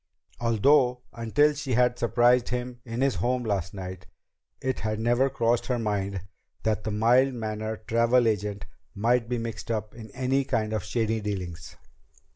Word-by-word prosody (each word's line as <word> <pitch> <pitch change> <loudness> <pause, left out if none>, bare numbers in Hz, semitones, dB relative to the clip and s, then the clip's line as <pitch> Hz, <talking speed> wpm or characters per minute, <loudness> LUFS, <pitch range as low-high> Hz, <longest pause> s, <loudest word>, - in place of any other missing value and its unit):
Although 125 +2 +3
until 140 +6 +2
she 140 -3 -3
had 125 0 +2
surprised 120 +1 +3
him 125 0 -4
in 120 +1 -4
his 135 -1 +3
home 125 +1 0
last 100 -4 -2
night, 95 -1 -7 0.5
it 130 -1 -2
had 110 0 -2
never 120 +4 +2
crossed 120 -1 +1
her 125 -1 0
mind 100 -4 -2 0.4
that 110 -1 0
the - - -2
mild 120 +5 +3
mannered 110 -1 -4
travel 115 +1 +3
agent 105 -1 -1 0.3
might 115 +3 +1
be 125 - 0
mixed 115 -1 -5
up 110 -2 -2
in 110 -2 -10
any 135 +1 +1
kind 110 -5 -1
of 110 -4 -1
shady 110 -2 -1
dealings. 90 -5 -5
115 Hz, 160 wpm, -27 LUFS, 105-125 Hz, 0.5 s, Although